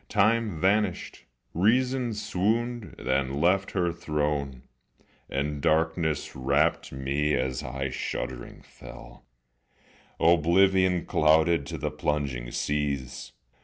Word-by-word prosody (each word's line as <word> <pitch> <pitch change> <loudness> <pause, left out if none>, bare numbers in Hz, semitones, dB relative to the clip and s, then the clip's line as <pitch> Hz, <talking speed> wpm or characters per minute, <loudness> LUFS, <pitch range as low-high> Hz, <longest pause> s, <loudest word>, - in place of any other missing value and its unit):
Time 105 -3 +2
vanished, 95 +1 0 0.3
reason 125 +6 +2
swooned, 110 +3 -2
then 65 +1 -1
left 95 +4 +2
her 85 -3 0
throne, 75 -5 -2 0.7
And 70 +1 -2
darkness 80 0 0
wrapt 70 +6 +1
me 70 +3 -1
as 65 0 -2
I 65 -1 -4
shuddering 65 -1 -5
fell, - - -13 0.9
Oblivion 90 +2 +3
clouded, 80 -1 +3
to - - -5
the - - -3
plunging 70 -5 -2
seas. 70 -2 -3
80 Hz, 95 wpm, -27 LUFS, 70-95 Hz, 0.9 s, Oblivion